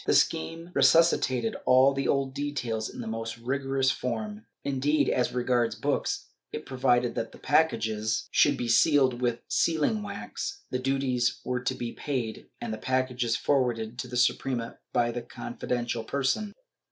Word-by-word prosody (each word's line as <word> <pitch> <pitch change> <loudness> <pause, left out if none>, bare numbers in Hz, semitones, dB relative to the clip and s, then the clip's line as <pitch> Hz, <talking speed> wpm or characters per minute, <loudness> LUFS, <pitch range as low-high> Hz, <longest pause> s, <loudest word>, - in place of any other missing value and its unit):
The - - +4
scheme 165 - +1
resuscitated 135 -5 +3
all 130 +2 +6
the 135 0 -1
old 135 -1 +1
details 130 -6 -2
in - - -8
the 115 - -6
most 115 0 -4
rigorous 135 +2 0
form; 110 -3 -4 0.2
indeed, 140 +2 +1
as 125 - +1
regards 125 -2 +1
books, - - -1 0.3
it - - -6
provided 125 -2 +2
that 115 - -3
the - - -13
packages 110 -8 +1
should 145 -2 +4
be 120 - -2
sealed 130 0 +4
with 120 -1 0
sealing 165 +6 +1
wax, 400 - -6
the 125 - 0
duties 130 -2 0
were 125 -1 -1
to 130 +1 -1
be 120 -2 -4
paid 125 -6 -4
and 115 -2 -4
the 110 - -5
packages 130 -1 0
forwarded 120 -4 0
to 125 - -3
the 125 0 -4
Suprema 120 -1 0
by 120 -1 +1
some 120 - -3
confidential 120 -1 -3
person. 140 - -1
125 Hz, 155 wpm, -28 LUFS, 120-135 Hz, 0.3 s, all